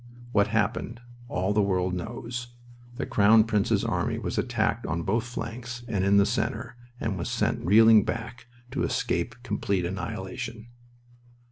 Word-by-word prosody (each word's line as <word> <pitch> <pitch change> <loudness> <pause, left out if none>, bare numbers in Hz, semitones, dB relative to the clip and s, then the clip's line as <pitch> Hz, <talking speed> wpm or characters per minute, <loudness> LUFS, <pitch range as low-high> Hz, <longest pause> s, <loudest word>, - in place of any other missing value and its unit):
What 100 -3 +3
happened 115 +2 -1 0.3
all 95 -2 0
the 105 - +3
world 95 -2 +1
knows. 120 +5 -5 0.4
The 140 - -3
Crown 110 +2 +5
Prince's 105 -3 +1
army - - -1
was - - -2
attacked - - 0
on 85 +1 -2
both 110 +6 +1
flanks 120 0 -6
and 100 -5 0
in 100 +1 +4
the 100 - +6
center, 115 +1 -2 0.2
and 100 -5 -2
was 85 - -3
sent - - 0
reeling 110 +3 +7
back 115 +2 -5 0.2
to 135 - -2
escape 85 - -1
complete 100 -5 -1
annihilation. 110 +5 -5
110 Hz, 145 wpm, -27 LUFS, 100-115 Hz, 0.4 s, reeling